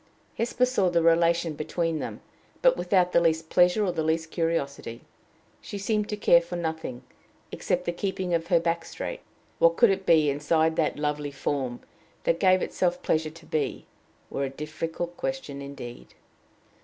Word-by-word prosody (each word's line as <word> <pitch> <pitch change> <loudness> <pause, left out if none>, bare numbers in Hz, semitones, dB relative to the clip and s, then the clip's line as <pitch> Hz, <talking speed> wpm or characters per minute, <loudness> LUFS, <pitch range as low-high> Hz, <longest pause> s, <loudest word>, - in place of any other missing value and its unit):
Hesper 240 +2 +1
saw 225 -8 +1
the 170 -1 +2
relation 170 0 +3
between 165 +2 -2
them, - - -6 0.4
but - - +6
without 180 - +2
the - - +5
least 160 -1 +1
pleasure 180 +4 +4
or 185 - +1
the 160 - -2
least 160 +1 -1
curiosity. 140 -8 -2 0.6
She 205 - -7
seemed 210 +1 -1
to 210 - -3
care 170 -4 +5
for 170 +1 -7
nothing 160 -7 -4 0.5
except 180 0 -1
the - - 0
keeping 185 0 -3
of 165 0 0
her 175 -2 +4
back 165 0 -1
straight. - - -6 0.4
What 165 0 +5
could 235 -4 +6
it 195 0 -3
be, 155 -3 +5
inside 160 +3 +1
that 155 - +1
lovely 150 0 -2
form, 135 -3 -3 0.4
that 165 - +1
gave 185 -1 +4
itself 180 -1 -1
pleasure 155 0 +1
to 165 +1 -15
be, 155 - -2 0.5
were 140 - -1
a - - -3
difficult 160 +4 -5
question 265 - -4
indeed. 140 -4 -9
165 Hz, 170 wpm, -26 LUFS, 155-180 Hz, 0.6 s, but